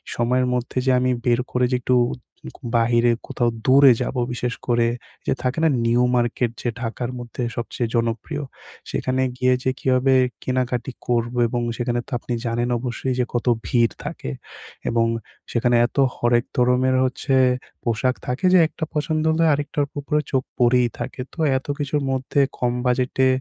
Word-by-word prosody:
সময়ের 125 +2 +1
মধ্যে 125 +1 -3
যে 130 - +4
আমি 130 0 +1
বের 120 -1 +3
করে 125 0 +2
যে - - +3
একটু 125 +1 +2 0.6
কু - - -36
বাইরে 120 +1 +3 0.2
কোথাও 120 -1 0 0.2
দূরে 135 +1 +7
যাবো 130 - -2
বিশেষ 120 0 -2
করে 120 -1 +3 0.4
যে - - +3
থাকে 125 +2 -1
না 160 - +5 0.2
নিউ 120 +1 +3
মার্কেট 120 0 +1
যে 120 - -1
ঢাকার 120 +1 -3
মধ্যে 120 +1 -5
সবচেয়ে 120 0 -3
জনপ্রিয়। 115 +6 -1 0.5
সেখানে 130 0 -1 0.2
গিয়ে 130 0 +3
যে 130 - +2
কীভাবে 130 +1 +2 0.3
কেনাকাটা 130 0 -1 0.2
করবো 120 0 0
এবং 120 +1 -2 0.2
সেখানে 120 -1 -1
তো - - -16
আপনি 120 - -4
জানেন 120 +1 -1
অবশ্যই 125 +1 -3
যে 125 - +2
কত 120 - -1 0.2
ভিড় 120 -4 +2
থাকে - - -5 0.6
এবং 115 0 +2 0.5
সেখানে 120 0 +2
এত - - -20 0.2
হরেক 120 0 +2
ধরনের 125 +1 +3
হচ্ছে 130 +1 0 0.5
পোশাক 120 +2 0
থাকে 125 +9 -2
যে 185 - +7
একটা 160 - -8
পছন্দ 155 +1 0
হলে 165 +1 +2
আরেকটার 145 0 -1 0.2
উপরে 150 +2 0
চোখ 130 -1 +1
পড়েই 125 0 +4
থাকে। 125 - -5
তো - - -14 0.2
এত 130 - -8
কিছুর 145 0 -1
মধ্যে 130 +2 -1 0.2
কম 120 -1 0
বাজেটে 130 +1 +2
125 Hz, 165 wpm, -22 LUFS, 120-130 Hz, 0.6 s, দূরে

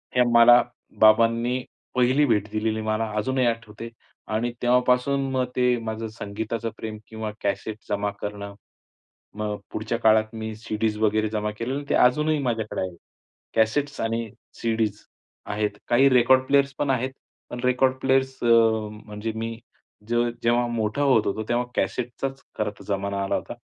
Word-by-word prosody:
हे 125 - +5
मला 120 +1 +8 0.4
बाबांनी 115 +3 +4 0.3
पहिली 130 +4 +4
भेट 105 -5 +1
दिलेली, 110 0 -1
मला 110 +1 0
अजूनही 130 +4 +1
आठवते 115 -1 -3 0.4
आणि 115 +3 0
तेव्हापासून 125 +2 +2
मग 130 -1 +1
ते 125 -1 +3
माझं 110 0 -4
संगीताचं 110 +1 -4
प्रेम 110 -1 -6
किंवा 110 -1 -5
कॅसेट 105 +2 -2
जमा 105 0 0
करणं. 100 -1 -5 0.8
मग 105 -1 -3
पुढच्या 110 +2 -2
काळात 110 0 +3
मी 110 0 -5
सी-डीज 110 -1 -2
वगैरे 110 0 +2
जमा 105 0 -2
केलेल्या, 130 +5 -3
ते - - +1
अजूनही 150 +5 +3
माझ्याकडे 115 -4 -2
आहे. 95 -2 -4 0.6
कॅसेट्स 140 +6 +1
आणि 115 0 -2 0.3
सी-डीज 110 -3 -1 0.4
आहेत, 105 0 -1 0.2
काही 130 +3 +5
रेकॉर्ड 130 0 +5
प्लेयर्स 140 0 +3
पण 145 - 0
आहेत. 130 0 0 0.4
पण 120 - -6
रेकॉर्ड 125 +1 +3
प्लेयर्स, 130 0 +1
अ, - - +2 0.6
म्हणजे 105 +1 -5
मी 115 0 -4 0.5
जे 120 +1 0 0.3
जेव्हा 120 +1 +2
मोठा 115 +2 -1
होत 130 -6 +4
होतो, 110 +2 -1
तेव्हा 120 +1 +1
कॅसेटचाच 125 +6 -2 0.2
खरं 105 - 0
तर - - -11
जमाना 100 0 -1
आला 95 - 0
होता. - - -4
115 Hz, 150 wpm, -24 LUFS, 110-125 Hz, 0.8 s, मला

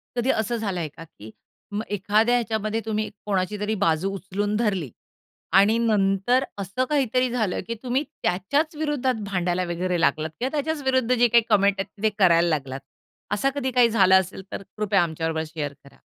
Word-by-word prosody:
कधी 245 +1 0
असं 220 +2 -1
झालंय 190 -7 -2
का? 155 +3 -12
की 110 -9 -14 0.4
मग 205 +2 -2
एखाद्या 215 +5 +2
ह्याच्यामध्ये 220 -2 -1
तुम्ही 215 -1 -2 0.2
कोणाची 200 0 -1
तरी 210 +1 -1
बाजू 165 +3 +1
उचलून 200 +2 -2
धरली 200 - 0 0.7
आणि 210 +3 +4
नंतर 215 +2 +2 0.2
असं 200 +7 -2
काहीतरी 255 -3 +1
झालं 220 -6 -1
की 230 - -3
तुम्ही 255 +3 0 0.2
त्याच्याच 285 - 0
विरुद्धात 280 -6 -1
भांडायला 180 -1 0
वगैरे 180 +1 -1
लागलात 155 +1 +1
किंवा 255 - -1
त्याच्याच 300 +1 -1
विरुद्ध 260 -2 +2
जे 245 -1 +4
काही 235 0 +4
कमेंट 200 -2 +4
आहेत 195 +2 -6
ते 220 - +4
करायला 170 -3 +5
लागलात. 135 -4 -2 0.5
असं 210 +7 +1
कधी 265 -2 -1
काही 245 -1 +4
झालं 190 -4 +5
असेल 190 +1 -6
तर - - -5
कृपया 205 -3 +2
आमच्याबरोबर 160 -1 -2
शेअर 145 -3 -3
करा. 140 - -18
210 Hz, 170 wpm, -24 LUFS, 180-240 Hz, 0.7 s, करायला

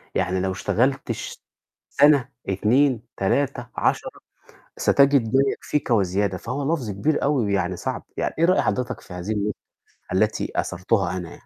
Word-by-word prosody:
يعني 95 0 0
لو 95 0 -1
اشتغلت 130 +6 0
ش 110 - -6 0.5
سنة، 140 -2 +4 0.2
2، 120 +5 +2
3، 125 +4 0
10، - - 0 0.7
ستجد 140 -3 +4
ما 135 - +6
يكفيك 150 -4 -3
وزيادة، 100 -2 +1
فهو 140 - -2
لفظ 120 -9 -4
كبير 125 +11 0
أوي 140 -4 +2
ويعني 95 -3 0
صعب - - -4
يعني - - -2
إيه 165 - +3
رأي 185 +2 +4
حضرتك 125 -2 -2
في - - -14
هذه 90 +5 -4
النقطة 105 0 -2 0.5
التي - - 0
أثرتها 95 +2 0
أنا 90 -2 -6
يعني؟ - - -11
115 Hz, 150 wpm, -23 LUFS, 95-140 Hz, 0.7 s, ما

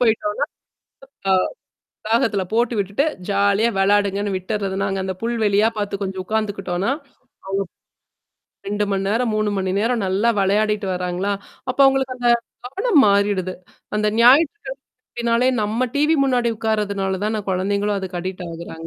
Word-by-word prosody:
போயிட்டோனா, 220 0 +1 0.9
அ - - +4 0.7
வளாகத்தில 220 -3 +1
போட்டு 235 +1 +1
விட்டுட்டு 200 +7 0 0.2
ஜாலியா 200 +2 +3
விளையாடுங்கன்னு 200 0 +2
விட்டுர்றது. 195 +1 -2
நாங்க 195 -1 -1
அந்த 190 -1 -3
புல் 235 +1 -1
வெளியா 205 +1 +4
பார்த்து 200 -1 -3
கொஞ்சம் 190 -1 -3
உட்காந்துக்கிட்டோன்னா. 200 -1 -1 1.5
அவுங்க - - -36
2 205 +1 0
மணி 195 0 0
நேரம், 230 +1 +1
3 215 0 +1
மணி 190 -1 -1
நேரம் 230 -1 0
நல்லா 195 +5 +2
விளையாடிட்டு 205 +1 +1
வராங்களா! 180 +2 -2 0.4
அப்ப 255 - -2
அவுங்களுக்கு 270 -1 +2
அந்த 240 -1 +1 0.4
கவனம் 390 - +2
மாறிடுது. 200 -2 +1 0.4
அந்த 210 0 +1
ஞாயிற்றுக்கிழமை 280 - +5 0.4
அப்பிடினாலே 240 +1 +1
நம்ம 215 +3 -1 0.2
டிவி 300 +3 +3
முன்னாடி 245 -3 +1
உட்கார்றதுனால 200 -3 -1
தான, 215 -1 -1
குழந்தைங்களும் 200 +2 0
அதுக்கு 185 -2 -5
அடிக்ட் 185 0 -5
ஆகுறாங்க. 165 -1 -8
205 Hz, 135 wpm, -21 LUFS, 195-230 Hz, 1.5 s, ஞாயிற்றுக்கிழமை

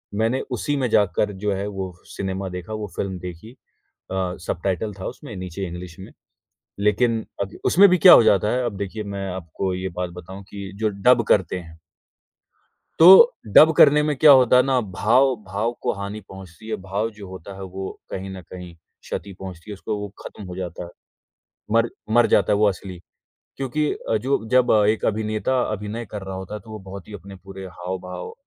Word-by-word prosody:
मैंने 115 +5 0
उसी 135 +4 -1
में 130 -3 0
जाकर 105 0 +2
जो 100 +1 -2
है 100 +2 -3
वो 95 -2 -5 0.2
सिनेमा 95 0 -3
देखा, 90 +3 -7
वो 110 -1 -4
फिल्म 95 -2 -3
देखी। 90 +5 -9
अ, 130 - -21 0.9
सबटाइटल 95 +4 -2
था - - -6
उसमें 120 -8 -9
नीचे 90 +1 -5
इंग्लिश 85 0 -8
में, 95 - -10 0.7
लेकिन 110 +2 +1 0.2
अब 100 +2 -7
उसमें 200 +3 +6
भी 180 0 +3
क्या 180 +1 +9
हो - - +9
जाता 105 -2 +3
है 125 0 0
अब 115 -4 -3
देखिए 100 +2 -4
मैं 100 0 -4
आपको 90 +1 -4
ये 95 +1 -3
बात 90 -1 -2
बताऊँ 95 +3 -10
कि 100 -1 -8
जो 110 - +2
डब 115 +5 +3
करते 95 -3 +2
हैं। 80 -2 -12 1.2
तो 165 - +7 0.5
डब 160 +1 +9
करने 150 0 +7
में 150 0 0
क्या 150 +3 +7
होता 125 -2 +6
है 125 - +7
ना 130 -2 +2
भाव 130 +7 +3
भाव 110 +4 -2
को - - 0
हानि 100 +2 -6
पहुँचती 95 +2 -12
है। - - -2
भाव 100 +4 -2
जो 100 -2 -9
होता 95 +1 -9
है, 95 - -9
वो 95 0 -6 0.2
कहीं 95 +1 -5
न 95 - -8
कहीं 90 -2 -9
क्षति 85 +4 -9
पहुँचती 95 0 -9
है - - -5
उसको, 105 +2 -4
वो 105 0 -5
खत्म 100 - -9
हो 90 -1 -8
जाता 90 -2 -5
है। 85 - -9 0.8
मर 115 +1 +3 0.2
मर 120 -1 +5
जाता - - +3
है - - +2
वो 105 0 +4
असली 95 -2 -4 0.6
क्योंकि 145 +3 -1
अ, 110 - -2
जो 130 +1 -1
जब 125 -1 +4 0.2
एक 110 - 0
अभिनेता 110 +4 0
अभिनय 105 +3 -5
कर 105 -2 -6
रहा 95 0 -6
होता 95 +2 -7
है, 105 - -6
तो 110 - -15
वो 110 - -7
बहुत 95 0 -10
ही 105 - -10
अपने 100 0 -10
पूरे 95 0 -9
हाव-भाव 90 +1 -7
100 Hz, 200 wpm, -22 LUFS, 95-115 Hz, 1.2 s, क्या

